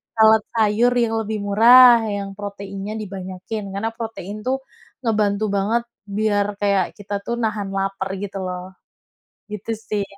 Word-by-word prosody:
salad 220 -1 +6
sayur 220 +2 +3
yang 235 -2 +1
lebih 220 0 -3
murah, 235 +3 +7
yang 200 -1 -3
proteinnya 200 0 -6
dibanyakin, 195 0 -6
karena 200 +3 -2
protein 225 -4 -6
tuh 265 +1 0 0.4
ngebantu 210 -2 +1
banget 215 +4 +1 0.3
biar 210 -1 +2 0.2
kayak 200 -2 +3
kita 205 0 -8
tuh 235 - -1
nahan 215 -3 -1
lapar, 195 0 -2
gitu 200 -1 -5
loh. 180 +1 -6 0.7
Gitu 210 +1 -5 0.2
sih. 205 -1 0
210 Hz, 135 wpm, -21 LUFS, 200-225 Hz, 0.7 s, murah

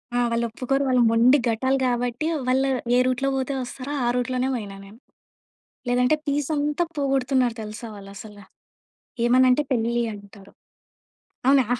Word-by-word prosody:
ఆ! - - +2
వాళ్ళు 235 0 0
ఒప్పుకోరు. 270 +4 -1
వాళ్ళు 250 -1 +3
మొండి 240 +5 +5
గట్టా‌లు 260 +4 +1
కాబట్టి 245 +4 -1 0.2
వాళ్ళు, 265 +2 +2 0.3
ఏ - - +5
రూట్‌లో 255 +2 0
పోతే 265 +1 -2
వస్తారో, 255 +3 -6
ఆ - - +1
రూట్‌లోనే 255 +1 -1
పోయినా 205 -4 -6
నేను. 210 +4 -15 0.9
లేదంటే 250 +4 +3
పీస్ 285 0 -1
అంతా 295 +4 0
పోగొడుతున్నారు 265 -3 +1
తెలుసా 215 +2 -7
వాళ్ళు 195 0 -11
అసల. 210 0 -11 0.9
ఏమన్నా 255 +2 +5
అంటే 295 +4 +2
పెళ్లి 235 0 +1
అంటారు. 200 -1 -14 1.0
అవునా? 270 -3 +5
250 Hz, 140 wpm, -24 LUFS, 230-270 Hz, 1.0 s, మొండి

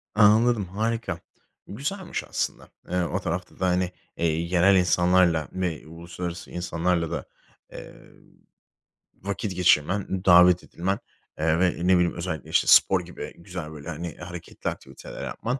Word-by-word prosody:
Anladım, 110 +1 +5
harika. 110 +5 -2 0.5
Güzelmiş 175 - -4
aslında. - - -3 0.2
Eee, 90 0 0
o 85 - -2
tarafta 85 +3 -5
da, 95 - +1
hani, 90 0 +1 0.3
eee, 85 - 0
yerel 85 +4 +3
insanlarla 90 -3 +3
m 90 -5 -3
uluslararası 85 +1 -7
insanlarla 85 -1 -1
da, - - -3 0.5
eee, - - -10 1.2
vakit 100 0 -4
geçirmen, 90 +2 +2
davet 90 0 +7
edilmen, 95 +3 -3 0.4
eee, 80 +1 +2
ve, 90 -1 +4 0.2
ne 95 - +6
bileyim, 90 -1 +2
özellikle, 85 -3 -5
işte, - - +2
spor - - +6
gibi - - -8
güzel, 90 -3 -7
böyle, 75 +1 -9
hani, 85 -1 -5
hareketli 85 -1 -6
aktiviteler - - -9
yapman, 125 +3 -3
90 Hz, 135 wpm, -25 LUFS, 85-95 Hz, 1.2 s, davet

